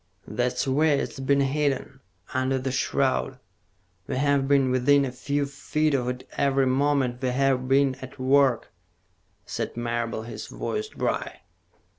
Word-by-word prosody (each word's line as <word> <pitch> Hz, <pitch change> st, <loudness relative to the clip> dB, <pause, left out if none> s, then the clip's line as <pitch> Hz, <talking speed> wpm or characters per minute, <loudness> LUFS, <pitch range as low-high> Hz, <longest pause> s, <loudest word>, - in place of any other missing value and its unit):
"That's 125 Hz, +2 st, -1 dB
where 145 Hz, +2 st, +3 dB
it's 140 Hz, -, -4 dB
been 140 Hz, +1 st, +2 dB
hidden, 135 Hz, -1 st, -1 dB, 0.3 s
under 130 Hz, +1 st, +1 dB
the 130 Hz, 0 st, -2 dB
shroud. 130 Hz, 0 st, 0 dB, 0.7 s
We've 140 Hz, 0 st, +1 dB
been 135 Hz, -2 st, +3 dB
within 140 Hz, +2 st, +4 dB
a 130 Hz, -, -4 dB
few 140 Hz, +3 st, -1 dB
feet 150 Hz, +2 st, -1 dB
of 125 Hz, -2 st, 0 dB
it 125 Hz, 0 st, -6 dB
every 135 Hz, -1 st, +2 dB
moment 130 Hz, -1 st, +1 dB
we've 130 Hz, 0 st, +1 dB
been 135 Hz, 0 st, +3 dB
at 130 Hz, +2 st, -9 dB
work," 130 Hz, -2 st, +2 dB, 0.7 s
said -, -, -4 dB
Marable, 120 Hz, -1 st, -2 dB
his 115 Hz, -, -7 dB
voice 430 Hz, 0 st, -3 dB
dry. -, -, -3 dB
135 Hz, 135 wpm, -25 LUFS, 130-140 Hz, 0.7 s, within